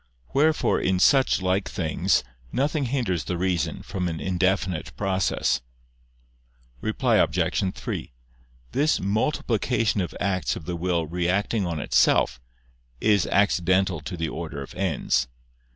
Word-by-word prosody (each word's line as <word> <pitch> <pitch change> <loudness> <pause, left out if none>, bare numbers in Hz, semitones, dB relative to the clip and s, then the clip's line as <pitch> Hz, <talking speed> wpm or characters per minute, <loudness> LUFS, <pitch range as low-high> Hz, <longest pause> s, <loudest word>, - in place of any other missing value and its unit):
Wherefore 155 +3 +3
in 95 - +1
such 130 0 +4
like 95 +2 0
things 80 -4 +1 0.3
nothing 145 +1 0
hinders 115 - -1
the 90 - -2
reason 90 -3 -1
from 90 -1 -3
an 80 -2 -3
indefinite 95 -1 -1
process. 95 -9 0 1.2
Reply - - +1
Obj. 95 -1 +1
3: - - -5 0.6
This 150 +3 +2
multiplication 110 0 0
of 90 - -4
acts 95 -2 0
of 80 - -8
the 90 - -3
will 85 -1 0
reacting 90 +5 0
on 85 -2 -3
itself, 65 - +2 0.6
is 105 -4 +3
accidental 95 -1 +2
to 90 - -6
the 80 0 -1
order 80 -4 -5
of - - -11
ends. 85 -9 0
95 Hz, 125 wpm, -25 LUFS, 85-105 Hz, 1.2 s, such